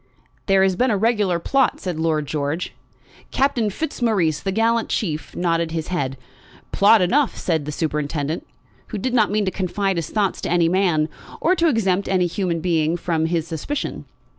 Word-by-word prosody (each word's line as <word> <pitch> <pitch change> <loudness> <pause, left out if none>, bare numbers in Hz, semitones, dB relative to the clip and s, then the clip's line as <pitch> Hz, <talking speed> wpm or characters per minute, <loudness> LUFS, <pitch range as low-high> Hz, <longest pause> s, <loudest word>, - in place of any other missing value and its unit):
"There 195 -1 +4
has 190 -1 +2
been 255 +6 +2
a 210 - +2
regular 210 -4 +2
plot," 265 +10 +1
said 180 -4 -4
Lord 160 -2 0
George. 150 +3 -3 0.6
Captain 260 -5 +1
Fitzmaurice, 205 - 0
the 195 - -2
gallant 225 +3 +1
chief, 160 -7 -3
nodded 170 -1 0
his 160 0 -4
head. 135 -7 -2 0.5
"Plot 205 0 +5
enough," 265 +9 +2
said 160 -5 -1
the 150 - -4
superintendent, 150 0 -2 0.4
who 215 - -5
did 245 +5 -2
not 220 -4 +3
mean 210 0 +1
to 190 - 0
confide 195 0 -1
his 165 -2 -3
thoughts 205 -3 0
to - - -3
any 170 -1 +3
man, 175 -4 +2 0.3
or 350 - +3
to 340 -2 +2
exempt 200 - +1
any 185 -2 +2
human 175 -2 -1
being 165 -1 +1
from 160 -2 0
his 165 -1 -1
suspicion. 220 - -4
180 Hz, 175 wpm, -21 LUFS, 160-215 Hz, 0.6 s, Plot